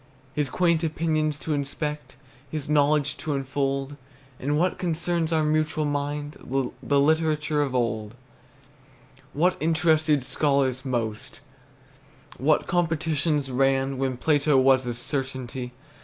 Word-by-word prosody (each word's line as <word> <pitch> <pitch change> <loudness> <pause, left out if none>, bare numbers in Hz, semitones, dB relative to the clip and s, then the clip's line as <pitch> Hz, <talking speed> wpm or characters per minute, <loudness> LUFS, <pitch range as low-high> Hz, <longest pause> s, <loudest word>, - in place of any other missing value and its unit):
His 150 -2 -1
quaint 170 0 +2
opinions 155 -2 0
to 155 - -3
inspect, 150 +1 -3 0.3
His 155 -3 -4
knowledge 145 -1 +2
to 150 -2 -2
unfold 135 +1 -2 0.4
On 145 +3 0
what 180 +3 +1
concerns 170 -1 -1
our 160 -1 +2
mutual 155 0 +1
mind, 145 0 -3
The 135 +2 -1
literature 155 0 +2
of 135 -3 -1
old; 115 -2 -1 1.2
What 175 +5 +2
interested 155 -3 +2
scholars 135 -1 +1
most, 120 0 -3 1.0
What 150 +3 +2
competitions 160 -4 0
ran 135 +1 +1
When 130 -2 -1
Plato 145 0 +3
was 130 -1 +4
a 120 - -2
certainty. 130 -1 -4
145 Hz, 115 wpm, -25 LUFS, 135-155 Hz, 1.2 s, was